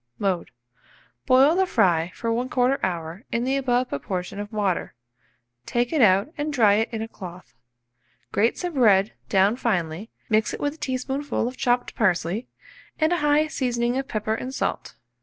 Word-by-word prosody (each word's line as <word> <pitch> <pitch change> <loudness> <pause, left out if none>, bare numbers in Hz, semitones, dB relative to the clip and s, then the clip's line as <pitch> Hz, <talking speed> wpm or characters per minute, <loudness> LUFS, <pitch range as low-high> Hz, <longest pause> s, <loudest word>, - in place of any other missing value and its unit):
Mode. 190 -4 -1 0.8
Boil 270 +4 +6
the 380 +1 +2
fry 175 - +2
for 230 - -2
1/4 250 +2 +1
hour 170 +2 -3
in 235 - 0
the 265 +2 0
above 255 -2 +1
proportion 180 +6 -4
of 205 +1 -6
water, 205 - -1 0.7
take 240 +4 0
it 305 - +2
out 200 - +4
and 300 +1 -1
dry 225 -8 +4
it 220 +2 +1
in 220 -1 -3
a - - -5
cloth; 180 -4 -11 0.8
grate 225 +3 +2
some 355 -2 -3
bread 210 -7 +4 0.2
down 195 +3 +3
finely, 190 -4 -2 0.2
mix 215 -1 +1
with 290 0 -1
it - - -16
a - - -38
teaspoonful 265 0 -2
of 250 - -5
chopped 245 0 0
parsley 190 +2 0 0.5
and 315 +2 +2
a - - +2
high 295 0 +3
seasoning 245 -5 -1
of 270 0 -2
pepper 215 0 -2
and 255 +4 -5
salt. - - -3
230 Hz, 170 wpm, -24 LUFS, 195-265 Hz, 0.8 s, Boil